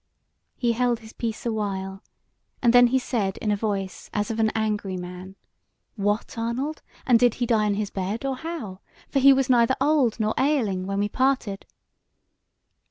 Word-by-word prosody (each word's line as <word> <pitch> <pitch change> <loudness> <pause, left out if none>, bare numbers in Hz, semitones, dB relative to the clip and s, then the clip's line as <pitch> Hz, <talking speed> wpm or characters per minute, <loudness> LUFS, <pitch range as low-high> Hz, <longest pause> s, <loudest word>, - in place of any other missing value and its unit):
He 240 -2 +1
held 240 0 0
his 220 0 -13
peace 225 -1 -4
awhile, 195 -4 -3 0.6
and 240 -2 +3
then 245 0 +8
he 260 +2 +2
said 220 -7 -1
in 215 - -1
a - - +2
voice 200 -3 -3
as 210 +2 -1
of 225 - -4
an 220 -1 +3
angry 210 -4 -1
man: 180 +1 -8 0.6
"What, 205 +2 -1
Arnold! 255 +7 -2 0.2
and 245 -4 +5
did 245 -1 +3
he 245 - -1
die 220 -3 +2
in 205 - +1
his 205 -1 -3
bed, 200 +6 -3
or 265 -1 -1
how? 265 - -6 0.3
for 275 - +1
he 275 +1 +8
was 270 -1 +3
neither 245 0 +4
old 270 -5 +2
nor 215 0 +1
ailing 220 -10 +1
when 195 0 -2
we 205 +1 +1
parted." 255 -4 -1
225 Hz, 175 wpm, -25 LUFS, 200-250 Hz, 0.6 s, then